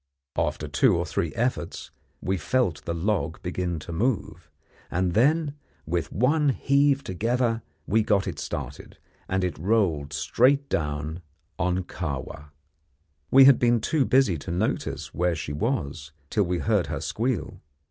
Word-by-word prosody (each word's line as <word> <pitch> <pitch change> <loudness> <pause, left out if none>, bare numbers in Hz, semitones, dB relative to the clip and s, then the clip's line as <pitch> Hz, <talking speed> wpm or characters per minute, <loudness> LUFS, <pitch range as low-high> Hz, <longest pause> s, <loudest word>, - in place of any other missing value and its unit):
After 75 -2 -1
two 100 - +3
or 85 - -1
three 85 -2 -2
efforts 120 -8 -2 0.3
we 95 - 0
felt 95 -1 0
the 85 - -2
log 100 +3 -1
begin 90 -2 -2
to 85 - -8
move, 95 -6 -2 0.4
and 90 0 0
then, 145 - +3 0.3
with 85 +1 -2
one 145 +7 +2
heave 140 +1 +2
together, 115 +4 0 0.2
we 110 +3 +3
got 105 -2 +2
it - - -4
started, - - -6 0.3
and 95 0 0
it 90 -3 -2
rolled 85 -7 +1
straight 130 - +2
down 75 +2 -2 0.4
on 90 +2 +1
Kahwa. 75 -3 -5 0.8
We 135 +5 +8
had 135 -2 +7
been 120 -1 +3
too 150 +6 +1
busy 130 - +3
to 70 - -9
notice 90 - -2
where 90 -1 +1
she 75 -2 -5
was 75 - -2 0.2
till 105 -3 +2
we 90 0 -1
heard 105 -4 +1
her 75 -1 -3
squeal. 115 - -2
95 Hz, 145 wpm, -26 LUFS, 80-125 Hz, 0.8 s, We